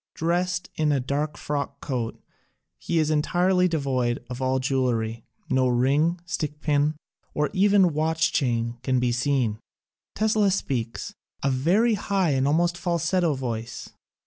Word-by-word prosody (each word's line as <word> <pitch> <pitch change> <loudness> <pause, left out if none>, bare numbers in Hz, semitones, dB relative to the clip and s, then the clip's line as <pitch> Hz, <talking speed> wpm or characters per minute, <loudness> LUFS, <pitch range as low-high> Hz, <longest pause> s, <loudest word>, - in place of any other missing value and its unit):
Drest 175 +2 -1
in 155 -1 +1
a 140 - +2
dark 140 +4 -2
frock 145 -1 -3
coat, 125 -5 -3 0.6
he 170 - -2
is 155 -1 +2
entirely 180 +4 +2
devoid 130 -7 -1
of 125 +1 -5
all 130 0 +1
jewelry. 125 -4 -1 0.2
No 130 0 +2
ring, 140 +8 +2
stickpin, 150 -2 0 0.4
or 150 0 0
even 195 -3 +4
watch 160 +1 +1
chain 120 -3 0
can 130 -1 +1
be 125 -1 +1
seen. 120 -3 0 0.6
Tesla 215 -1 +2
speaks 120 - -2
— - - -21
a 135 - +2
very 180 - +3
high 195 -6 +1
almost 170 +5 +1
falsetto 170 -2 +1
voice. 120 -2 -5
150 Hz, 135 wpm, -25 LUFS, 130-175 Hz, 0.6 s, even